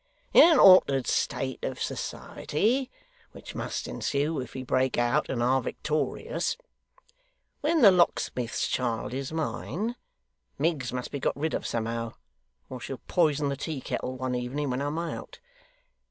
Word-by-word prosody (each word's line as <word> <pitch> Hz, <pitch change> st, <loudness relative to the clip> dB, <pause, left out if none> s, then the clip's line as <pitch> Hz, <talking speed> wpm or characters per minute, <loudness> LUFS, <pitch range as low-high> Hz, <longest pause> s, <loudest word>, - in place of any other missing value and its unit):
In 335 Hz, -, +9 dB
an -, -, +4 dB
altered 140 Hz, -9 st, +7 dB
state 130 Hz, -1 st, -1 dB
of 130 Hz, -, -3 dB
society 245 Hz, -, -1 dB, 0.4 s
which -, -, -10 dB
must -, -, -4 dB
ensue 145 Hz, +2 st, -1 dB
if 125 Hz, -1 st, -7 dB
we 130 Hz, -, -4 dB
break 130 Hz, 0 st, +1 dB
out 120 Hz, +5 st, +1 dB
and 120 Hz, -2 st, -1 dB
are 130 Hz, +2 st, +3 dB
victorious 155 Hz, +5 st, -2 dB, 1.0 s
when 310 Hz, -1 st, +2 dB
the 200 Hz, -, +10 dB
locksmith's 150 Hz, -9 st, +1 dB
child 120 Hz, -2 st, -2 dB
is 135 Hz, +1 st, -4 dB
mine, 175 Hz, +8 st, -3 dB, 0.6 s
Miggs 145 Hz, -4 st, 0 dB
must 125 Hz, 0 st, -4 dB
be 140 Hz, -, -3 dB
got -, -, -1 dB
rid 155 Hz, +2 st, -1 dB
of -, -, -2 dB
somehow, 115 Hz, 0 st, -2 dB, 0.5 s
or 130 Hz, -, -7 dB
she'll 125 Hz, +4 st, -6 dB
poison 150 Hz, -5 st, +2 dB
the 140 Hz, -, -1 dB
tea 145 Hz, +1 st, -4 dB
kettle 130 Hz, 0 st, -4 dB
one 130 Hz, 0 st, -2 dB
evening 130 Hz, +3 st, -2 dB
when 125 Hz, +2 st, -2 dB
I'm 145 Hz, +2 st, -2 dB
out. 170 Hz, -, -5 dB
140 Hz, 150 wpm, -28 LUFS, 125-160 Hz, 1.0 s, the